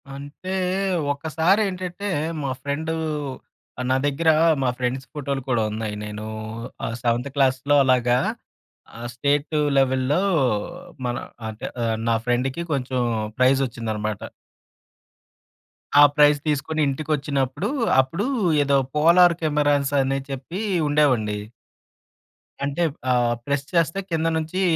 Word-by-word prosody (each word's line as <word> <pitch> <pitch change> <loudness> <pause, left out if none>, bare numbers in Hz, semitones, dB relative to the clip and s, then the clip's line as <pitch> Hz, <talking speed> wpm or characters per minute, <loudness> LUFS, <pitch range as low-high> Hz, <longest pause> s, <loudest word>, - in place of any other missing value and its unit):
అంటే 145 +7 -8 0.6
ఒక్కసారి 160 +7 +1
ఏంటంటే, 185 +2 -5 0.4
మా 135 - -1
ఫ్రెండ్ 155 +3 -2
ఆహ్, 145 -4 -6
నా - - +4
దగ్గర 155 +3 +1 0.3
మా 130 - +2
ఫ్రెండ్స్ 130 +1 -2
ఫోటో‌లు 140 -2 -3
కూడా 120 -3 +2
ఉన్నాయి. 110 -1 -4
నేను 105 0 -6 0.6
ఆహ్, 115 - -3
సెవెంత్ 120 +3 0
క్లాస్‌లో 135 +1 +2
అలాగా 125 -2 +3 0.8
ఆహ్, 120 +1 -5
స్టేట్ 145 +4 0 0.2
లెవెల్‌లో 130 +4 +2 0.9
మన 120 - -2 0.3
అంటే 110 0 -7 0.2
ఆహ్, 115 -1 0
నా 115 - +3
ఫ్రెండ్‌కి 130 +6 0
కొంచెం 130 -2 -1 0.4
ప్రైజ్ 130 +1 +4
వచ్చిందన్నమాట. 110 -3 -4 1.8
ఆ - - +10
ప్రైజ్ 150 -1 +5
తీసుకొని 155 +2 0
ఇంటికి 140 +3 -3
వచ్చినప్పుడు, 140 - -2 0.3
అప్పుడు 165 - -3 0.4
ఏదో 140 0 +3 0.2
పోలార్ 170 +3 +6
కెమెరాస్ 145 -2 +1
అని 135 +1 0
చెప్పి 135 +8 -5 0.3
ఉండేవండి. 125 -8 +2 1.3
అంటే, 145 +4 -2 0.3
ఆహ్, 120 -1 +2
ప్రెస్ 140 -1 -1
చేస్తే 165 +2 +2
కింద 165 0 +1
నుంచి 160 +4 -2
140 Hz, 115 wpm, -23 LUFS, 125-155 Hz, 1.8 s, ఆ